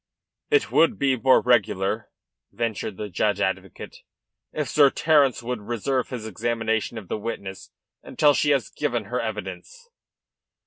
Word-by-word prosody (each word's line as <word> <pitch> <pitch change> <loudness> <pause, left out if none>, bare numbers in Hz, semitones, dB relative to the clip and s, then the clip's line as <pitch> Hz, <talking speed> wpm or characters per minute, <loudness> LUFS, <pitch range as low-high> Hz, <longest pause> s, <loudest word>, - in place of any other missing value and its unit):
"It 435 -1 +2
would 165 - +4
be 135 -1 +2
more 130 +2 +4
regular," 100 -5 +1 0.4
ventured 110 -2 -3
the 105 - -4
judge 100 +2 0
advocate, 95 -1 -3 0.5
"if 150 -2 -3
Sir 145 -2 +5
Terence 145 -5 +2
would 125 0 -3
reserve 120 +4 -2
his 120 -4 -6
examination 110 +1 -2
of 105 -5 -8
the 110 - -3
witness 100 -3 -6 0.3
until 145 -1 +3
she 145 - +1
has 140 -2 +1
given - - -2
her - - -2
evidence." 475 0 -7
120 Hz, 140 wpm, -24 LUFS, 105-140 Hz, 0.5 s, Sir